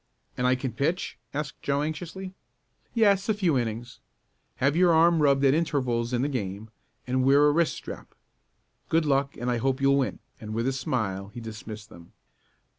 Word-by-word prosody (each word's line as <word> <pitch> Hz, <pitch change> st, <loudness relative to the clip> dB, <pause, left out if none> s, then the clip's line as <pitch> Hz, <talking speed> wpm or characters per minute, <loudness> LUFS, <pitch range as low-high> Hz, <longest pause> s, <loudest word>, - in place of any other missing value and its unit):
"And 125 Hz, -, 0 dB
I 130 Hz, -, +4 dB
can 130 Hz, 0 st, -3 dB
pitch?" 160 Hz, +9 st, -2 dB
asked 145 Hz, 0 st, -5 dB
Joe 140 Hz, +1 st, 0 dB
anxiously. 175 Hz, +4 st, -5 dB, 0.6 s
"Yes, 200 Hz, -3 st, +3 dB
a 215 Hz, -, +3 dB
few 180 Hz, -7 st, +1 dB
innings. 120 Hz, 0 st, -3 dB, 0.6 s
Have 140 Hz, +3 st, +1 dB
your 175 Hz, 0 st, +5 dB
arm 165 Hz, 0 st, +5 dB
rubbed 140 Hz, -1 st, +4 dB
at 135 Hz, -, +5 dB
intervals 130 Hz, -7 st, 0 dB
in 125 Hz, 0 st, 0 dB
the -, -, +1 dB
game, 110 Hz, -5 st, -4 dB, 0.3 s
and 130 Hz, +1 st, 0 dB
wear 140 Hz, +2 st, +5 dB
a 150 Hz, -, +5 dB
wrist 165 Hz, +1 st, +2 dB
strap. -, -, -9 dB, 0.7 s
Good 165 Hz, 0 st, +2 dB
luck 140 Hz, -1 st, +1 dB
and 125 Hz, +1 st, -1 dB
I 120 Hz, -, +1 dB
hope 130 Hz, +3 st, 0 dB
you'll 140 Hz, 0 st, +4 dB
win," 135 Hz, -, -1 dB, 0.2 s
and 110 Hz, 0 st, -6 dB
with 115 Hz, +2 st, 0 dB
a 135 Hz, -, +1 dB
smile 105 Hz, -7 st, -2 dB
he 105 Hz, +4 st, -9 dB
dismissed 110 Hz, -1 st, -8 dB
them. 85 Hz, -4 st, -15 dB
135 Hz, 185 wpm, -27 LUFS, 120-155 Hz, 0.7 s, your